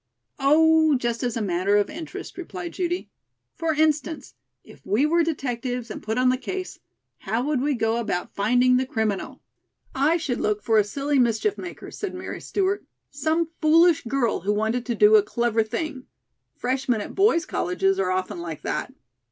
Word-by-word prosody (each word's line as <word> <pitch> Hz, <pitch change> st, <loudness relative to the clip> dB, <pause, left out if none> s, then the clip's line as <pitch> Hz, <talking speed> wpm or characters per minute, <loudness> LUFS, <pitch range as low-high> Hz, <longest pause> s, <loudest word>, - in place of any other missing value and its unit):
"Oh, 315 Hz, +2 st, +5 dB
just 240 Hz, -2 st, -1 dB
as 240 Hz, -2 st, -1 dB
a 225 Hz, -, -1 dB
matter 190 Hz, +2 st, +1 dB
of 205 Hz, -, +2 dB
interest," 320 Hz, 0 st, -8 dB
replied 360 Hz, -1 st, -7 dB
Judy. 355 Hz, 0 st, -3 dB, 0.4 s
"For 325 Hz, -2 st, -1 dB
instance, 310 Hz, -, 0 dB, 0.3 s
if 135 Hz, -, -17 dB
we 215 Hz, +9 st, +2 dB
were 335 Hz, +3 st, +3 dB
detectives 250 Hz, -6 st, -3 dB
and -, -, -6 dB
put 220 Hz, +2 st, -3 dB
on 255 Hz, 0 st, +4 dB
the 255 Hz, -, +2 dB
case, 370 Hz, +8 st, -5 dB, 0.4 s
how 225 Hz, +4 st, -2 dB
would 290 Hz, -2 st, 0 dB
we 285 Hz, 0 st, +1 dB
go 225 Hz, -1 st, 0 dB
about 205 Hz, -6 st, -3 dB
finding 245 Hz, +5 st, +3 dB
the 260 Hz, 0 st, 0 dB
criminal?" 220 Hz, -7 st, -2 dB, 0.5 s
"I 295 Hz, +5 st, +2 dB
should 285 Hz, -7 st, -3 dB
look 210 Hz, -1 st, 0 dB
for 220 Hz, -1 st, +4 dB
a -, -, +4 dB
silly 280 Hz, +7 st, -1 dB
mischief 240 Hz, -, +2 dB
maker," 355 Hz, -, -8 dB
said 400 Hz, -3 st, -5 dB
Mary 360 Hz, -, -6 dB
Stewart. 395 Hz, 0 st, -1 dB, 0.3 s
"Some 315 Hz, +3 st, 0 dB
foolish 330 Hz, +1 st, +5 dB
girl 240 Hz, -1 st, 0 dB
who 200 Hz, +4 st, 0 dB
wanted 220 Hz, +4 st, -1 dB
to 240 Hz, -, -1 dB
do 425 Hz, +1 st, +7 dB
a -, -, +6 dB
clever 235 Hz, -, 0 dB
thing. 260 Hz, +4 st, -5 dB, 0.5 s
Freshmen 255 Hz, -2 st, -1 dB
at -, -, -7 dB
boys' 390 Hz, -4 st, +3 dB
colleges 195 Hz, +2 st, 0 dB
are 190 Hz, -1 st, +1 dB
often 185 Hz, -1 st, -2 dB
like 165 Hz, -3 st, -6 dB
that." -, -, -3 dB
255 Hz, 175 wpm, -24 LUFS, 220-320 Hz, 0.5 s, do